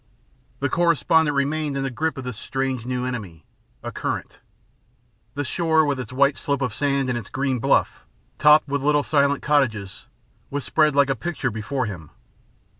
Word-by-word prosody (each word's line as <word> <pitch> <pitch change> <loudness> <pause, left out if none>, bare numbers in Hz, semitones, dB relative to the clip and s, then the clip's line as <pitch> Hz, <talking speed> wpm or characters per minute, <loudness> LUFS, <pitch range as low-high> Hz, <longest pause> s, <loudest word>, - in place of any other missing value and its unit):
The 140 - +2
correspondent 160 -1 +2
remained 145 0 0
in 135 - -1
the 135 - -2
grip 160 +5 -2
of 130 - -5
this 125 -2 -5
strange 130 0 -3
new 125 0 -2
enemy 100 - -6 0.4
a - - -5
current. - - -4 1.0
The 145 - -1
shore, 160 +2 +2
with 140 -2 -1
its 125 -3 -6
white 140 +2 +2
slope 140 -1 -1
of 125 -4 -2
sand 140 +1 0
and 125 - -1
its 105 - -10
green 135 -2 -1
bluff, - - +1 0.4
topped 150 0 +6
with 140 0 -1
little 145 +1 +2
silent 140 -1 +1
cottages, 110 -10 0 0.4
was 140 0 -3
spread 155 -2 +2
like 140 -1 +4
a - - 0
picture 150 -5 -3
before 115 +5 -2
him. 90 -8 -7
140 Hz, 175 wpm, -23 LUFS, 125-145 Hz, 1.0 s, topped